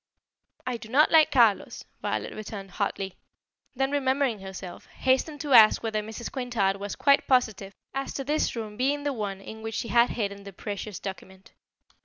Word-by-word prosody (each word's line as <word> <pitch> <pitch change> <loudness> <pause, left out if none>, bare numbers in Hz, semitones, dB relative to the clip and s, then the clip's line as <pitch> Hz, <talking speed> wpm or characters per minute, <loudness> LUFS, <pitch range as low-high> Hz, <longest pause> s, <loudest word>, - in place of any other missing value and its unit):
"I 250 -2 -2
do 220 -1 -11
not 285 +6 +4
like 315 -2 +6
Carlos," 230 -6 +2 0.2
Violet - - -2
returned 200 -2 -7
hotly; 190 +1 -3 0.6
then 270 +2 0
remembering 265 -4 +1
herself, 190 -2 -9
hastened 275 +3 0
to 290 -3 -1
ask 220 -1 +7
whether 220 -1 -1
Mrs. 220 +2 -7
Quintard 235 -7 0
was 200 0 -5
quite 280 -1 +3
positive 215 -7 +1 0.2
as 270 0 -3
to 275 - -3
this 295 0 0
room 215 -2 -6
being 280 +3 0
the 290 -1 -1
one 200 -5 -4
in 220 +2 -9
which 225 0 -5
she 230 - -3
had 235 +1 +4
hidden 200 -3 -3
the 200 0 -10
precious 205 +1 -6
document. 190 0 -9
225 Hz, 175 wpm, -27 LUFS, 200-265 Hz, 0.6 s, ask